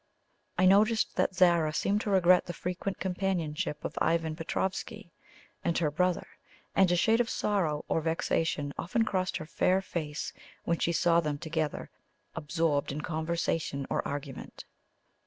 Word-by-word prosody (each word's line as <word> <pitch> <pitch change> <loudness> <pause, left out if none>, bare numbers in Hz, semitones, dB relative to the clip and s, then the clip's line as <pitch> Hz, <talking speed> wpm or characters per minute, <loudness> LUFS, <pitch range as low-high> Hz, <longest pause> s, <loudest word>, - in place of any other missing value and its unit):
I 185 - +4
noticed 215 +4 +4
that 185 - +1
Zara 170 -4 +4
seemed 205 +1 +1
to 215 - -3
regret 185 -2 +4
the 175 - -4
frequent 185 +2 -3
companionship 180 -6 -2
of - - -4
Ivan 165 -1 +1
Petroffsky 190 +4 -3 0.5
and 170 - +1
her 155 -3 +1
brother, 180 +3 +1 0.5
and 190 -2 +5
a - - +4
shade 225 +6 +3
of 235 - -2
sorrow 170 -8 0
or 165 - +1
vexation 160 -2 -1
often 225 +6 +1
crossed 185 -3 -1
her 155 - -7
fair 185 +4 +2
face 155 -5 -4 0.3
when 170 - 0
she 170 - +1
saw 170 0 +3
them 150 -3 -1
together 160 -1 -3 0.4
absorbed 150 -2 0
in 150 +2 -4
conversation 160 -3 -2
or - - +1
argument. 140 -2 -7
170 Hz, 150 wpm, -30 LUFS, 155-185 Hz, 0.5 s, and